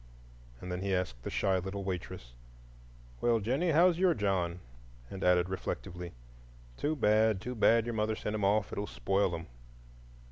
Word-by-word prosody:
And 90 - -7
then 90 0 -3
he 95 -1 0
asked 65 -10 -3
the - - -5
shy 95 -1 +1
little 95 +2 -5
waitress, 90 -8 -5 0.9
"Well, 120 -1 +3
Jennie, 130 - 0
how's 170 +2 +4
your 185 -3 +4
John?" 90 -5 0 0.5
and 95 - -6
added 90 -1 +4
reflectively, 90 -2 -5 0.6
"Too 150 - -1
bad, 110 -4 +3
too 125 +5 -5
bad 115 0 +4
your 120 - -3
mother 110 0 0
sent 105 - -4
him 105 -2 -2
off—it 100 +1 +1
will 105 - -3
spoil 95 0 0
him." 85 0 -7
100 Hz, 165 wpm, -31 LUFS, 90-110 Hz, 0.9 s, how's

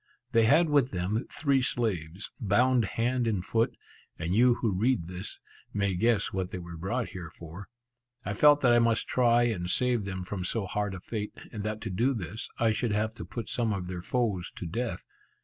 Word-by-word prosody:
They 115 -1 +4
had 155 +9 +5
with 145 -4 +3
them 95 +5 -2
three 140 -3 +2
slaves, 100 -8 -2
bound 120 +3 +3
hand 120 +1 +1
and 100 -5 -1
foot, 115 0 +1 0.4
and 85 +2 -2
you 120 +3 +5
who 110 -5 -1
read 105 -4 +1
this, 90 +3 -7 0.4
may 100 -1 +1
guess 110 +3 +1
what 95 -1 -2
they 90 - -5
were 85 -1 -8
brought 105 +9 -2
here 85 -3 -7
for. 85 +4 -10 0.6
I 100 - -2
felt 145 +6 +6
that 125 -2 +5
I 120 - +6
must 115 -1 +2
try 120 -1 +4
and 95 -7 -1
save 120 -1 +1
them 95 -1 -4
from 90 0 -4
so 100 +3 -1
hard 100 +1 -2
a - - -6
fate, 105 +2 -5
and 105 - -5
that 110 0 -3
to 110 - -4
do 125 +9 +1
this, 105 +3 -5
I 115 -1 +3
should 110 0 0
have 110 +1 0
to - - -8
put 115 - -6
some 115 -3 0
of 95 -3 -2
their 90 -1 -5
foes 105 -5 -1
to - - -6
death. 115 +8 -3
110 Hz, 205 wpm, -29 LUFS, 95-120 Hz, 0.6 s, felt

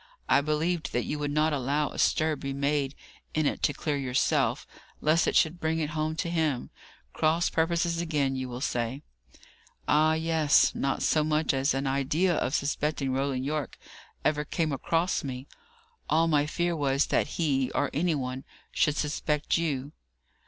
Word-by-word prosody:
I - - +4
believed 155 +3 -1
that 120 - +1
you 150 - -3
would 145 0 -1
not 150 +1 +1
allow 145 +2 0
a - - -8
stir 155 -1 +2
be 140 -1 -5
made 140 0 0 0.4
in 155 -1 +1
it - - -1
to - - +2
clear 145 0 -2
yourself, 130 -1 +1 0.3
lest 155 +2 +2
it - - 0
should 165 +1 +3
bring 160 0 0
it 155 -2 -2
home 155 0 -2
to 170 - -2
him. 155 -7 -1 0.4
Cross 160 +2 +1
purposes 170 +1 +1
again, 145 -5 0
you 130 -1 -4
will 125 +1 -6
say." 125 +1 -2 0.8
"Ah, 155 +1 +4
yes. 160 -2 +3
Not 135 0 -1
so 155 - +3
much 155 0 +1
as 135 +1 +1
an 135 +1 -1
idea 140 +7 +1
of 130 -3 0
suspecting 140 -1 -1
Roland 135 -1 -1
Yorke 150 -2 -3 0.5
ever 150 -1 +2
came 155 +1 -1
across 165 +6 0
me. 130 -1 -5 0.6
All 165 +1 +3
my 150 -2 +2
fear 175 +2 -1
was, 140 -2 +1
that - - +1
he, 135 -6 +1
or 145 - +1
any 165 +2 +1
one, 130 -1 -4 0.3
should 150 - +2
suspect 150 0 0
you." 145 -4 -2
150 Hz, 170 wpm, -28 LUFS, 135-160 Hz, 0.8 s, I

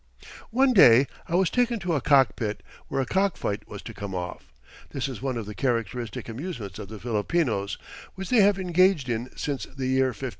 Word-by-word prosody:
One 260 +2 +3
day 130 - +8 0.2
I 170 - -1
was 185 -1 +3
taken 245 -1 +2
to 175 -1 -1
a 145 - +1
cockpit, 120 -7 +2 0.2
where 135 - -1
a - - -1
cockfight 165 - -1
was 105 -2 -9
to 115 - -8
come 100 -2 -6
off. 90 -5 -6 0.4
This 135 -1 -3
is 130 -4 -7
one 130 -2 -2
of 115 - -4
the 105 - -7
characteristic 115 -2 -2
amusements 115 - -6
of 105 - -7
the 110 - -8
Filipinos, 110 - -1 0.4
which 190 -1 -6
they 240 -4 +6
have 200 0 +4
engaged 180 -6 +2
in 120 +2 -2
since 140 -2 -3
the 135 -1 -6
year 130 0 +3
1500. 130 +1 -4
130 Hz, 195 wpm, -26 LUFS, 110-175 Hz, 0.4 s, day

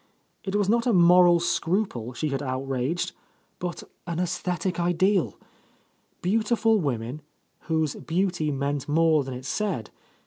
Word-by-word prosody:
It 195 0 -3
was 205 -2 +2
not 230 +3 +2
a 240 - +3
moral 175 -1 +6
scruple 170 - -1
she 155 +4 -2
had 135 0 -2
out 130 0 -3
raged, 135 +6 -1 0.5
but 175 -1 -4 0.2
an 170 -1 -2
aesthetic 180 0 -2
ideal. 180 +2 +1 0.9
Beautiful 225 +3 +2
women, 130 - -3 0.5
whose 160 -3 +1
beauty 175 -2 -1
meant 140 0 -2
more 160 -1 +3
than 130 -1 -6
it 130 +1 -8
said 170 - -2
170 Hz, 135 wpm, -26 LUFS, 140-185 Hz, 0.9 s, moral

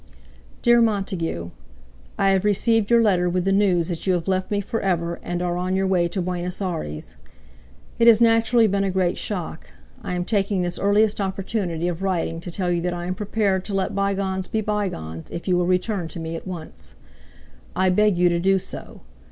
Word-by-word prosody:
"DEAR 240 -1 +5
MONTAGUE, 190 - -1 0.7
"I 195 0 +3
have 190 -1 +2
received 210 +1 +2
your 235 -1 +5
letter 180 -4 +2
with 180 0 -1
the 195 - +2
news 190 -4 +2
that 175 0 -4
you 185 - +4
have 170 0 -3
left 185 -1 0
me 205 - 0
for 205 +3 -3
ever 170 -3 -1
and 175 0 -3
are 175 -1 -1
on 180 +1 -1
your 190 0 +1
way 180 -2 +2
to 180 +1 -3
Buenos 180 0 -3
Aires. 160 - -4 0.8
It 235 - +5
has 225 -2 +8
naturally 230 0 +4
been 200 -1 +1
a 195 - 0
great 185 -1 0
shock. 175 -5 -4 0.3
I 180 - -4
am 175 0 -2
taking 200 -2 0
this 175 0 -3
earliest 205 +1 +2
opportunity 190 -3 -2
of 175 0 -3
writing 175 -4 -1
to 170 - -7
tell 180 0 -1
you 170 -1 0
that 175 0 -2
I 175 0 -5
am 180 - -1
prepared 200 -2 0
to 200 - -3
let 190 -1 -1
bygones 195 -1 -1
be 220 - -1
bygones 185 - -3
if 170 - -7
you 180 - +3
will 175 0 +1
return 185 0 0
to 160 - -8
me 165 0 -4
at 165 - -7
once. 155 - -8 0.8
I 185 0 +3
beg 210 0 +3
you 180 0 +4
to 170 0 0
do 195 +2 +3
so. 185 - -8
185 Hz, 205 wpm, -23 LUFS, 175-200 Hz, 0.8 s, has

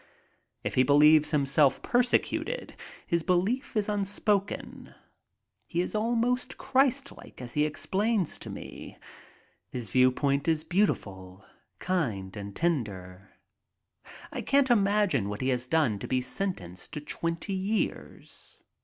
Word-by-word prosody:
If - - -2
he - - +4
believes 150 +3 +6
himself 140 -2 +2
persecuted, 250 - 0 0.3
his 170 0 0
belief 195 - 0
is 210 - +1
unspoken. 205 0 -2 0.7
He 170 - -2
is 180 - -3
almost 240 +3 0
Christlike 270 +1 0
as 120 -1 -7
he 150 0 +2
explains 190 +6 -1
to - - -9
me. - - -9 0.7
His 120 -5 -5
viewpoint 135 +3 +2
is 160 -1 +2
beautiful, 100 - -1 0.3
kind, 115 - -2
and 100 -1 -7
tender. 100 - -2 1.0
I - - -4
can't 275 -2 +3
imagine 200 - +2
what 105 - -5
he 130 - 0
has 125 -1 0
done 135 -9 +1
to - - -6
be 130 - +1
sentenced 125 - -4
to 150 - -4
twenty 165 +5 -3
years. 195 +3 -4
160 Hz, 120 wpm, -28 LUFS, 125-205 Hz, 1.0 s, believes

